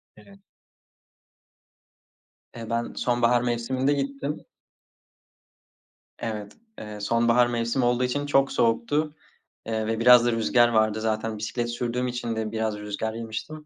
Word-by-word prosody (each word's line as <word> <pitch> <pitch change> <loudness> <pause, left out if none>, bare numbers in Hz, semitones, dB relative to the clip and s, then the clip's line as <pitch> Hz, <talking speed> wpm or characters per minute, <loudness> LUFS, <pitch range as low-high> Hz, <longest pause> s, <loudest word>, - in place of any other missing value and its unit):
Evet. 200 0 -17 2.2
Eee, 115 -1 -7
ben 115 0 -2
sonbahar 120 0 +2
mevsiminde 125 +3 0
gittim. 140 +1 -3 1.7
Evet, 105 -2 -5 0.3
eee, 105 -1 -8
sonbahar 120 +3 +3
mevsim 120 +2 -1
olduğu 120 +1 +2
için 145 +3 -1
çok 135 -1 +2
soğuktu, 145 +7 +1 0.5
eee, 110 -1 -2
ve 115 0 -1
biraz 125 0 +7
da 120 - +3
rüzgâr 120 +1 +3
vardı. 110 -1 +2
Zaten 110 0 -2
bisiklet 120 +2 -3
sürdüğüm 120 +1 -2
için 120 -2 -3
de 110 -1 -3
biraz 110 -1 -2
rüzgâr 105 +1 -4
yemiştim. 115 +7 -6
120 Hz, 125 wpm, -25 LUFS, 110-125 Hz, 2.2 s, biraz